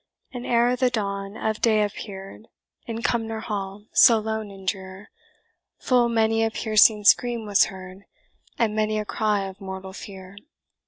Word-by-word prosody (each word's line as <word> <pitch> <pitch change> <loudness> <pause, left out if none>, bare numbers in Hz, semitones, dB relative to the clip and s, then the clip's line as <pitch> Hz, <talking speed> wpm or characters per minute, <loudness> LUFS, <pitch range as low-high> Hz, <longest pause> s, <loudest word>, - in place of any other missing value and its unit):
And 245 -1 -6
ere 240 +1 +3
the 250 0 +2
dawn 200 -3 -4
of 220 -1 -2
day 215 -2 +3
appear'd, 200 +1 -7 0.4
In 230 0 -5
Cumnor 225 -2 -1
Hall, 205 -2 -5
so 230 - +7
lone 220 -1 -3
and 195 -1 -13
drear, 190 +1 -5 0.7
Full 245 -2 +2
many 225 -1 +2
a 225 - +2
piercing 215 -1 +3
scream 235 +1 +3
was 205 -2 +4
heard, 190 0 -10 0.5
And 220 -2 0
many 215 0 0
a 210 - -2
cry 210 -1 0
of 195 0 -8
mortal 190 0 -7
fear. 190 -1 -11
215 Hz, 155 wpm, -24 LUFS, 195-225 Hz, 0.7 s, so